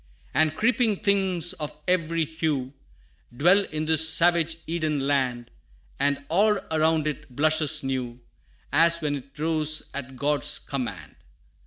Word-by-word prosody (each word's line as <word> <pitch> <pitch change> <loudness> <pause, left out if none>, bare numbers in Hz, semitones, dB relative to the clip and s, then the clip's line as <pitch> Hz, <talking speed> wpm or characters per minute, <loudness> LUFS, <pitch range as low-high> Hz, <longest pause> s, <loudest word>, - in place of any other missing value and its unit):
And 155 -1 +2
creeping 230 0 +2
things 190 -4 +1
of 150 -1 -6 0.2
every 165 -2 +1
hue, 150 -4 -3 0.6
Dwell 185 +7 +4
in 155 0 -4
this 160 0 +4
savage 165 -1 +3
Eden 155 -3 -2
land, 130 -4 -1 0.5
And 140 0 0
all 205 +6 +3
around 160 0 +1
it 150 -4 -5
blushes 155 +1 +1
new, 125 -2 -4 0.5
As 170 +3 +5
when 150 -2 -2
it 135 +1 -14
rose 155 0 +1
at 135 -2 -6
God's 145 +2 0
command. 135 -3 -6
155 Hz, 130 wpm, -25 LUFS, 140-165 Hz, 0.6 s, As